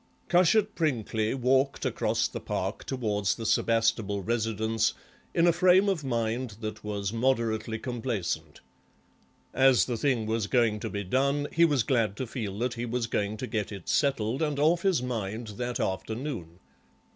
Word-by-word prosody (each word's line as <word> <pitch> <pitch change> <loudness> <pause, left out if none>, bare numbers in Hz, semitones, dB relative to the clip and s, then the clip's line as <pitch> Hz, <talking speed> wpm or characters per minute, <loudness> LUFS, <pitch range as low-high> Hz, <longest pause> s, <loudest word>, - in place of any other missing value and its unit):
Cushat 205 +4 +4
Prinkly 115 -7 0
walked 135 +2 +1
across - - +1
the - - -6
Park - - -3
towards 105 -7 -1
the 115 - -6
Sebastable 110 -2 +1
residence 110 -1 0 0.4
in 170 - +4
a 170 - +5
frame 185 +3 +5
of 185 -6 0
mind 115 -2 -2
that 110 -1 -6
was 100 -1 -3
moderately 115 -2 0
complacent. 120 -6 -3 0.9
As 130 -3 +5
the 120 -2 -2
thing 125 -3 +1
was 110 -1 -1
going 115 -4 +2
to - - -4
be 100 0 -3
done 140 +8 +1
he 170 +1 +5
was 145 -7 +2
glad 115 -5 +1
to 130 - -2
feel 110 -5 -5
that 120 +2 -1
he 120 0 -4
was 120 0 -1
going 105 -1 -2
to 130 - -4
get 110 -5 -3
it 100 -4 -8
settled 135 -3 +1
and 150 -3 0
off 160 +4 +3
his 185 -9 +2
mind 110 -2 -4
that 125 0 -3
afternoon. 95 - -3
115 Hz, 160 wpm, -28 LUFS, 110-135 Hz, 0.9 s, a